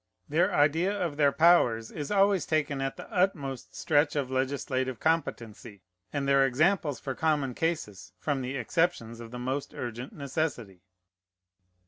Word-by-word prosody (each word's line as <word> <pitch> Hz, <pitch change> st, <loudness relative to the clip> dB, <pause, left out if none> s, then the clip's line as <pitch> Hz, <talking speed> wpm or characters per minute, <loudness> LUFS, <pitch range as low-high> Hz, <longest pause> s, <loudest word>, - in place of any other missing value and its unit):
Their 175 Hz, +6 st, +2 dB
idea 160 Hz, +4 st, +3 dB
of 170 Hz, -5 st, -2 dB
their 145 Hz, -2 st, +4 dB
powers 125 Hz, -10 st, +4 dB
is 150 Hz, -3 st, -5 dB
always 200 Hz, -2 st, +3 dB
taken 145 Hz, -3 st, 0 dB
at 135 Hz, 0 st, -3 dB
the -, -, -9 dB
utmost 155 Hz, -, -1 dB
stretch 145 Hz, -1 st, +2 dB
of 135 Hz, -3 st, -1 dB
legislative 130 Hz, -1 st, -1 dB
competency, 115 Hz, -, -2 dB, 0.3 s
and 140 Hz, -2 st, -2 dB
their 140 Hz, 0 st, +5 dB
examples 150 Hz, +2 st, +1 dB
for 135 Hz, -, -4 dB
common 145 Hz, -3 st, 0 dB
cases 115 Hz, -, -3 dB
from 140 Hz, +5 st, -2 dB
the 130 Hz, +2 st, -3 dB
exceptions 120 Hz, -3 st, -1 dB
of 115 Hz, -1 st, -9 dB
the 125 Hz, -, -7 dB
most 130 Hz, +3 st, -3 dB
urgent 120 Hz, +1 st, -5 dB
necessity. 135 Hz, -, -4 dB
140 Hz, 145 wpm, -28 LUFS, 125-160 Hz, 0.3 s, their